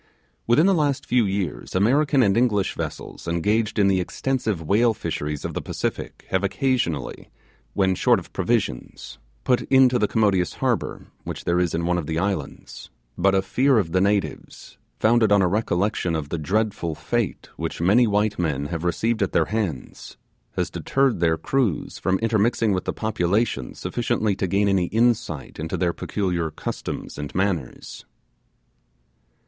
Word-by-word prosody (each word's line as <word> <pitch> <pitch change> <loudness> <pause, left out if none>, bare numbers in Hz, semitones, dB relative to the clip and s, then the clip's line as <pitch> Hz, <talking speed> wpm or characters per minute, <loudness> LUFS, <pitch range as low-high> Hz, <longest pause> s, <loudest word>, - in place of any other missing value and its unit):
Within 120 +8 +5
the 195 - +4
last 145 -5 0
few, 120 -2 +2
years 95 -5 -3
American 135 +7 +3
and 100 -3 +3
English 110 -5 +2
vessels - - -6
engaged 105 +7 0
in 100 -2 +4
the 95 -1 +3
extensive 110 +1 -2
whale 110 +8 +2
fisheries 75 -6 -4
of - - -4
the - - -3
Pacific - - -4
have 95 +1 0
occasionally, 100 - -1 0.5
when 95 -2 +2
short - - +3
of - - -9
provisions, 60 0 -2 0.2
put 125 - +2
into 130 -2 +5
the 105 - +2
commodious 100 -7 +1
harbour - - -2 0.2
which - - -6
there 85 +1 +1
is 90 -3 0
in 85 +1 -1
one 90 0 +1
of 75 - -6
the 80 - -2
islands; 75 -9 -4 0.3
but 95 +2 +2
a 95 - +2
fear 130 +6 +2
of 90 -7 0
the 95 +1 +2
natives, 100 0 -2 0.2
founded 110 -1 +3
on 100 -1 +5
the - - +3
recollection 90 -2 0
of 75 -3 -4
the 85 - -3
dreadful 95 -1 -1
fate - - -2
which - - -4
many 105 +8 +4
white 105 0 0
men 75 -5 -1
have 85 0 -3
received 110 +6 0
at 100 - 0
their 80 - +3
hands, 95 - -4 0.4
has - - -2
deterred 135 -7 +1
their 80 -1 +2
crews 115 - -1
from 95 0 +1
intermixing 110 -1 +2
with 90 - -2
the - - -1
population 100 - -1
sufficiently 110 -4 -1
to 95 - -2
gain 100 +3 +2
any 95 -3 +2
insight 110 - 0
into 80 +4 -3
their 85 -1 0
peculiar 90 -5 -2
customs 75 - -6
and 75 -1 -6
manners. 90 -8 -3
100 Hz, 165 wpm, -23 LUFS, 85-110 Hz, 0.5 s, Within